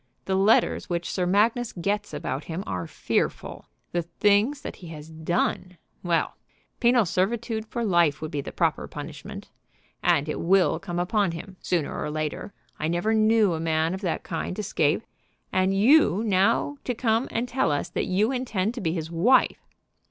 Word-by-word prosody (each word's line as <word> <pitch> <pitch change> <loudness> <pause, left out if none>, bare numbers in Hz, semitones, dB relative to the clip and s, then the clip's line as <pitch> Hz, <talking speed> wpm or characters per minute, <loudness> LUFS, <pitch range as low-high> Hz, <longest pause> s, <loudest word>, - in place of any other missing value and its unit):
The 190 - -1
letters 195 +3 +3
which 170 -1 -2
Sir 180 -2 -1
Magnus 220 +5 +2
gets 205 +4 -2
about 140 +3 -4
him 170 +3 -4
are 90 -3 -4
fearful. - - -2 0.3
The 175 - 0
things 205 - +2
that - - -7
he 175 - -11
has 155 -1 -9
done, 175 +2 -2 0.2
well, 170 -2 0 0.4
penal 240 -2 +4
servitude 220 +5 -1
for 235 +1 -3
life 170 -7 +3
would 155 0 -5
be 145 - -2
the - - -7
proper - - 0
punishment. - - -8 0.5
And 145 +1 +2
it 150 - -3
will 185 +2 +3
come 175 -3 -5
upon 185 0 +1
him 185 +3 -8
sooner 170 -5 -1
or 150 - -3
later. 155 +5 -4 0.3
I 155 - -1
never 175 +7 0
knew 220 -3 +4
a 160 - -3
man 160 +1 0
of 190 - -5
that 180 -5 -2
kind 170 +2 -4
escape. 165 -4 0 0.5
And 185 0 +2
you 215 - +4
now 220 +7 +2
to 250 - -1
come 230 +1 +1
and 235 +2 -2
tell 255 -5 +1
us 145 - -1
that - - -2
you 205 +6 +2
intend 230 -5 -1
to 245 - -6
be 165 -4 0
his 160 -2 -4
wife!" 220 +11 +3
185 Hz, 175 wpm, -25 LUFS, 165-220 Hz, 0.5 s, penal